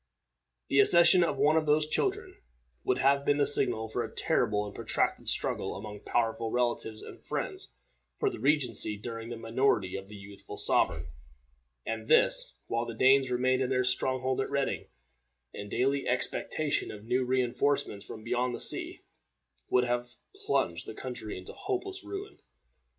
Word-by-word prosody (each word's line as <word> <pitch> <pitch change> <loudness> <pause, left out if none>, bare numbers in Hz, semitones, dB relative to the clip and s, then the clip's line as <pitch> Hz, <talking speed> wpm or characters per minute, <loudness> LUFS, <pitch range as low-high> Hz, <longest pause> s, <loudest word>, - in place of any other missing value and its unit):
The 135 - +3
accession 170 +5 +6
of 170 - -1
one 155 +2 +4
of 155 -1 +1
those 150 +1 +3
children 390 - -2 0.4
would 390 - +1
have 140 0 +3
been 145 0 +2
the 145 - +3
signal 120 -6 +1
for 110 - -2
a - - -7
terrible 105 -1 +1
and 100 - -8
protracted - - -1
struggle - - +3
among 105 +1 -7
powerful 115 0 -1
relatives 120 -2 -1
and - - -11
friends - - -4 0.4
for - - -1
the - - -2
regency 125 -6 +2
during 115 +1 -7
the 120 - -5
minority 115 -4 +1
of 95 0 -7
the 105 - -10
youthful 100 0 -10
sovereign, - - +1 0.8
and 110 -1 -4
this, - - +4
while 115 0 -2
the 115 - -6
Danes 130 +2 +5
remained 130 +1 +1
in 130 - 0
their 125 -1 +2
strong 130 +1 +1
hold 130 0 0
at - - -3
Reading, 140 -1 -1 0.7
in 100 - -7
daily 135 +4 0
expectation 145 +4 -1
of 105 -1 -9
new 125 +2 +1
re 130 0 +2
enforcements 120 -4 0
from 110 - -9
beyond 125 +1 -1
the - - -7
sea, - - -3 0.7
would 125 - +4
have 120 0 -1 0.4
plunged 85 -1 0
the 110 - -7
country 120 -4 -6
in 95 - -10
hopeless 385 0 -4
ruin. 395 +1 -7
125 Hz, 165 wpm, -30 LUFS, 110-140 Hz, 0.8 s, accession